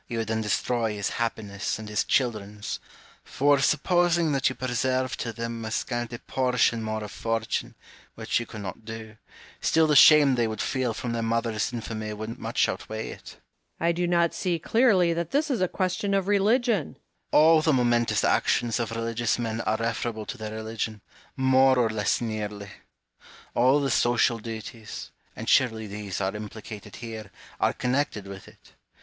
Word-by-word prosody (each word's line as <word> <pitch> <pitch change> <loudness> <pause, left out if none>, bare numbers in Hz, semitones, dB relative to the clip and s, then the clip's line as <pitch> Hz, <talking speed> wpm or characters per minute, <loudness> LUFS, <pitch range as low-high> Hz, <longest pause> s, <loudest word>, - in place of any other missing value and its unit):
You 120 - -4
would 110 -1 -2
then 110 0 0
destroy 110 +1 0
his 100 -1 -1
happiness 105 -3 -2
and 110 -1 -8
his 105 0 0
children's; 105 -5 -1 0.4
for, 145 +1 +2
supposing 175 +2 +2
that 135 -2 +2
you 130 - -6
preserved 130 +1 -1
to 115 - -2
them 115 0 -5
a 110 - -4
scanty 120 +1 -3
portion 125 -2 +1
more 110 0 -3
of 105 - -7
fortune 115 -1 -2 0.4
(which - - -1
you 120 - -6
could 110 - -8
not 100 +3 -7
do), 110 0 -8 0.4
still 160 0 +3
the 150 -1 +2
shame 145 -1 +8
they 120 -2 +1
would 110 -1 -5
feel 130 -4 -1
from 120 - -4
their 115 0 -1
mother's 115 -1 0
infamy 110 -2 -5
would 110 +2 -6
much - - +1
outweigh 110 +1 -5
it. - - -11
Home. - - -24 0.5
I - - +5
do 175 +1 -1
not 170 -1 +2
see 175 -2 -1
clearly 185 -1 +3
that 170 0 -3
this 295 +1 +1
is 235 -7 0
a 185 - +3
question 185 +2 -1
of 195 -1 0
religion. 205 - +2
Hume. - - -31 0.3
All 160 +1 +6
the 155 - +2
momentous 120 -3 +2
actions 120 0 +2
of 115 - -1
religious 115 0 -1
men 115 -2 -2
are 110 - 0
referable 115 -1 -2
to - - -6
their 110 0 -5
religion, 110 -1 -4 0.4
more 130 0 +4
or 115 -3 +2
less 105 -2 0
nearly; 105 -3 -4 0.8
all 130 +4 +4
the 140 -2 0
social 120 -1 +2
duties, 110 0 -7 0.2
and - - -7
surely 110 -4 +3
these 100 -2 -5
are 95 +1 -1
implicated 105 0 -8
here, 110 -3 -7 0.3
are - - +3
connected 125 -5 -1
with 100 -1 -9
it. - - -19
115 Hz, 175 wpm, -26 LUFS, 110-135 Hz, 0.8 s, shame